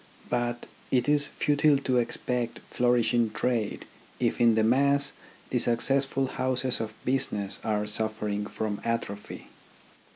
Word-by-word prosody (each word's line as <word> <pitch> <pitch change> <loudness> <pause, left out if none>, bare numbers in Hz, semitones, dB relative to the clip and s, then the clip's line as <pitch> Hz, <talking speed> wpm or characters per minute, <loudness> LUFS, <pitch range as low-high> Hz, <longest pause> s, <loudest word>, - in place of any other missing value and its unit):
But 120 0 -1 0.2
it 125 0 +2
is 145 0 +3
futile 145 0 +2
to 130 -2 0
expect 120 0 -2
flourishing 120 -1 +2
trade, 115 -1 -1 0.3
if - - 0
in 115 -2 +5
the 110 - +3
mass 140 +4 +2 0.4
the 125 - +2
successful 135 +3 +2
houses 130 0 0
of 110 -1 -5
business 115 -7 -1
are 105 -1 0
suffering 105 -1 0
from 105 -2 -4
atrophy. 115 -3 -4
120 Hz, 125 wpm, -27 LUFS, 110-130 Hz, 0.4 s, in